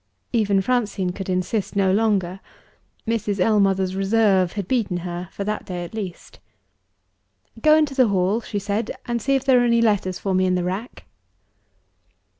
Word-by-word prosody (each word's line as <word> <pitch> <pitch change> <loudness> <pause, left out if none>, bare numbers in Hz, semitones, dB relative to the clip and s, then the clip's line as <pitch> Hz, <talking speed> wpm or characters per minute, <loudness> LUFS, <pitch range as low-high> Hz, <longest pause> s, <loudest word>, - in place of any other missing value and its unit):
Even 205 -4 +2
Francine 210 -6 0
could 190 +1 -7
insist 185 +3 -2
no 195 -1 +3
longer: 195 -4 +1 0.7
Mrs. 210 -3 -1
Ellmother's 195 -2 +2
reserve 195 -2 +2
had 200 -3 -4
beaten 215 -8 0
her 175 0 -5
for 200 - -5
that 210 +1 -3
day 180 -2 -5
at 170 - -12
least. 195 -6 -7 1.2
"Go 305 +4 +6
into 305 -3 +2
the 260 -3 +4
hall," 195 +3 +1
she 210 - -5
said, 205 +3 -2 0.2
"and 235 -1 -2
see 275 +4 +1
if 270 0 -1
there 260 -2 +5
are - - +2
any 235 -1 +3
letters 205 -5 +1
for 195 +1 -2
me 185 0 +2
in 185 - +1
the 180 - -1
rack." 190 +7 -5
200 Hz, 170 wpm, -22 LUFS, 185-225 Hz, 1.2 s, Go